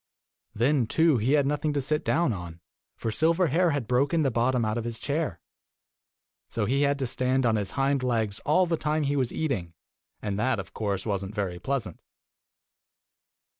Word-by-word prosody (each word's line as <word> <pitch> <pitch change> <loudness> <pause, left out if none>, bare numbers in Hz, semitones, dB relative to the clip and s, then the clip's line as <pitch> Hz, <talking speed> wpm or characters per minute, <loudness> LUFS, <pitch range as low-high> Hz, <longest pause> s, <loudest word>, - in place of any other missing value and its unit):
Then, 125 +1 +2
too, 160 +1 +3
he 125 +7 +1
had 145 -2 +4
nothing 150 +1 0
to 145 - 0
sit 150 +3 -1
down 165 -6 +2
on, 85 -3 -8 0.4
for 115 - -3
Silverhair 170 - +3
had 145 -5 -1
broken 140 +7 +2
the 135 - +1
bottom 120 +1 +1
out 110 0 -1
of - - -4
his 115 -1 -4
chair. 140 - -2 1.1
So 110 - -1
he 135 +6 +1
had 140 0 +2
to 135 - -2
stand 130 +1 0
on 115 -2 +3
his 105 -3 -2
hind 135 0 +2
legs 115 -5 0
all 180 +5 +3
the 165 -1 0
time 155 0 0
he 145 0 0
was 130 -4 0
eating, 95 - -2 0.4
and 100 -1 -3
that, 130 +3 +1
of - - -8
course, 100 -3 -2
was 100 -3 -1
n't 95 +2 -7
very 95 -4 -2
pleasant. 130 - -3
130 Hz, 185 wpm, -27 LUFS, 110-145 Hz, 1.1 s, had